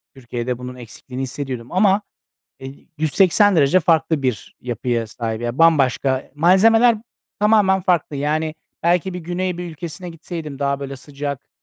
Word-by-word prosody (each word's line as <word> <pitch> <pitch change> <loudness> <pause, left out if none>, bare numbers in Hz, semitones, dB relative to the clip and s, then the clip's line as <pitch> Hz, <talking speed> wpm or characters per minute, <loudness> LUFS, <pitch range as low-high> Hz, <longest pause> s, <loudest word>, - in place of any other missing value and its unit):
Türkiye'de 120 -1 -4
bunun 125 0 -8
eksikliğini 125 +2 -9
hissediyordum 130 -3 -5
ama, 195 +2 +3 0.6
eee, 135 +1 -11
180 190 +5 +4
derece 150 +4 +4
farklı 160 -2 +2
bir 125 -6 -3
yapıya 120 -1 -2
sahip, 110 0 -4
ya, 120 +2 -3
bambaşka, 135 -4 +3
malzemeler 220 +8 +5 0.4
tamamen 205 -3 +4
farklı. 175 -5 0
Yani, 155 +2 -1 0.3
belki 175 +2 +2
bir 180 - -4
Güney 180 +1 -3
bir 175 -1 -5
ülkesine 170 +3 -7
gitseydim 165 -3 -7
daha, 140 0 0
böyle, 140 -1 -6
sıcak, 140 0 -6
150 Hz, 140 wpm, -20 LUFS, 130-180 Hz, 0.6 s, malzemeler